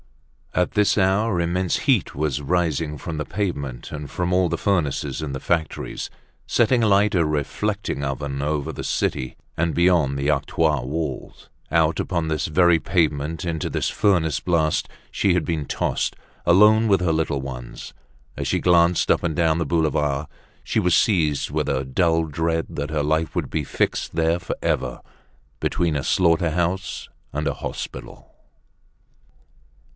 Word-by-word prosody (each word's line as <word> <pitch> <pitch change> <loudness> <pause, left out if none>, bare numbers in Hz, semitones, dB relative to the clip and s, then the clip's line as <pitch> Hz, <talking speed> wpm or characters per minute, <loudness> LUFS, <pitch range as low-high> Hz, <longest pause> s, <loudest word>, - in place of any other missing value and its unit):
At 90 - +1
this 105 0 +2
hour 95 0 +2
immense 85 +1 0
heat - - +2
was 75 -1 -1
rising 80 -1 0
from 80 +2 -5
the 75 - -1
pavement 70 -11 -4
and 75 -2 -6
from 90 +4 -2
all 90 -1 +3
the - - -1
furnaces 85 -7 -1
in 75 -3 -4
the 65 - -4
factories, 80 +2 -2 0.4
setting 120 +1 +2
alight 105 0 +4
a 85 - +4
reflecting 75 +3 -2
oven 70 0 -3
over 75 -1 -2
the - - -6
city 65 - -2 0.2
and 85 0 0
beyond 85 -6 +3
the 70 +1 -1
octroi 75 0 +1
wall. 80 +5 -4 0.3
Out 80 0 +2
upon 85 -3 -1
this 80 -1 -1
very 85 +1 +4
pavement, 80 -2 0
into 80 -2 -2
this - - -1
furnace 85 -8 +2
blast, 80 -3 0 0.2
she 95 -3 +2
had 90 - 0
been 80 -4 -2
tossed, - - -1 0.3
alone 105 +5 +6
with 100 -3 +4
her 90 -2 +1
little 80 -3 0
ones. 65 -3 -8 0.4
As - - -3
she - - +1
glanced 85 -1 +3
up - - +2
and 80 -3 -1
down 80 -1 +2
the 85 - 0
boulevard, 75 -2 0 0.4
she - - 0
was 90 -1 +3
seized 80 -9 +2
with - - -1
a 65 -1 0
dull 80 +4 +2
dread 80 +2 -1
that 70 0 -4
her 75 -1 -1
life 80 +2 0
would - - -2
be 80 - -1
fixed 70 - -1
there 80 +1 +2
forever, 60 -8 -2 0.6
between 85 -3 0
a 70 - -1
slaughter 85 -1 +3
house 85 +3 -2 0.2
and - - -2
a - - 0
hospital. - - -7
80 Hz, 160 wpm, -23 LUFS, 75-90 Hz, 0.6 s, alone